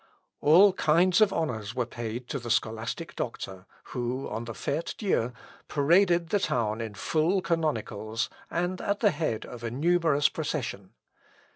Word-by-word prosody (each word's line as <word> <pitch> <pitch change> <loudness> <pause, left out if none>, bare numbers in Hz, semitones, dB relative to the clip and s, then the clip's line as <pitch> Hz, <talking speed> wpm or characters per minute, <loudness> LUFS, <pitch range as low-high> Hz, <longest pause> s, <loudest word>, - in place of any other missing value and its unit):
All 185 +6 +7
kinds 175 +2 +3
of 210 -2 +6
honours 115 -9 -2
were 125 -1 0
paid 120 +1 -5
to 140 - -2
the 120 -1 -7
scholastic 115 +10 -1
doctor, 95 -5 -5 0.3
who, 125 +1 -2
on 110 +2 -4
the 115 - -6
Fête 145 +8 -3
Dieu, 125 - 0 0.4
paraded 170 +3 +3
the 205 - +2
town 115 - 0
in 110 -2 -5
full 160 - +1
canonicals, 115 -9 -1 0.2
and 175 +2 -1
at 200 0 -1
the 210 -3 +5
head 145 -8 -2
of 120 -1 -10
a 115 - -1
numerous 150 +2 +3
procession. 125 - -4
140 Hz, 150 wpm, -28 LUFS, 115-170 Hz, 0.4 s, All